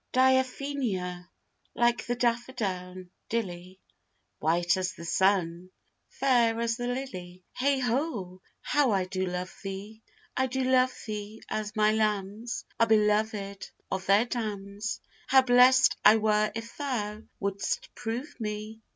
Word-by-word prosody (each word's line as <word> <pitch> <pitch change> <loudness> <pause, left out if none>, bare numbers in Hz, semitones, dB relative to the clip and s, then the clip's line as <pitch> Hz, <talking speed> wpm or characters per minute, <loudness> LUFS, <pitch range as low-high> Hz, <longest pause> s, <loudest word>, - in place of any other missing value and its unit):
Diaphenia, 255 -9 +1 0.5
like 240 0 +2
the 245 - 0
daffa 240 +1 0
down 185 -4 -4 0.2
dilly, 185 -4 -4 0.6
White 170 +2 +2
as 185 0 -2
the 170 - -10
sun, 180 0 +1 0.4
fair 235 -4 +2
as 230 -1 0
the 245 0 -3
lily, 185 -9 -5
Heigh 275 +1 +1
ho, 230 - -2 0.2
how 290 -3 +2
I 195 -4 +2
do 185 0 -2
love 180 +1 -4
thee! 200 +3 -7 0.3
I 260 0 +2
do 260 +1 -1
love 255 0 +4
thee 215 0 -6
as 215 -1 -3
my 215 0 +4
lambs 215 +1 -1
Are 230 - +5
belovèd 210 -2 +1 0.2
of 190 0 -3
their 200 +4 +5
dams: 210 -3 -4 0.3
How 265 0 +6
blest 255 +1 +6
I 215 - +8
were 215 -1 +2
if 230 +1 -6
thou 215 -7 -3 0.2
would'st 205 - -2
prove 240 +6 -5
me! 215 0 -5
215 Hz, 135 wpm, -28 LUFS, 190-245 Hz, 0.6 s, I